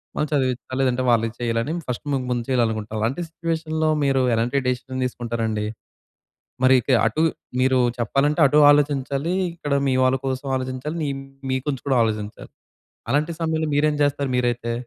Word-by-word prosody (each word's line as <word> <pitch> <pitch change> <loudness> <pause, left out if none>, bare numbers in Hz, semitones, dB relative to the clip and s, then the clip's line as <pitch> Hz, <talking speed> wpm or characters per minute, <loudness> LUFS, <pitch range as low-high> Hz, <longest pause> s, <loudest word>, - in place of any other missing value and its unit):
వాళ్ళను 150 - -1
చదివించాలి. 130 -2 -1
లేదంటే 130 -1 +1
వాళ్ళకి 115 -1 +2
చెయ్యాలని 115 +3 -1 0.2
ఫస్ట్ 125 +4 -4
మీకు 135 -2 -1
ముందు 120 -1 -1
చేయాలనుకుంటాం. 110 -4 0
అలాంటి 125 +10 -1
సిట్యుయేషన్‌లో 160 -1 -2
మీరు 135 -1 +2
ఎలాంటి 120 +4 0
డెసిషన్ 130 +1 -2
తీసుకుంటారండి? 115 -3 -2 1.0
మరి 130 0 +6
ఇక - - -13 0.2
అటు 115 +8 0 0.4
మీరు 130 0 +3 0.2
చెప్పాలంటే 135 +6 +1
అటూ 150 - +2
ఆలోచించాలి, 145 +2 +1 0.2
ఇక్కడ 150 -4 -4
మీ 130 - +2
వాళ్ళ 130 0 +3
కోసం 130 +1 -3
ఆలోచించాలి. 130 +4 -4
నీ - - -1 0.4
మీ - - +1
గురించి 140 -4 -3
కూడా 135 -2 +3
ఆలోచించాలి. 105 -1 -4 0.6
అలాంటి 150 +5 +1
సమయంలో 160 -1 0
మీరేం 150 +1 +2
చేస్తారు 140 -1 0
మీరైతే? 120 -1 -1
130 Hz, 150 wpm, -22 LUFS, 120-145 Hz, 1.0 s, మరి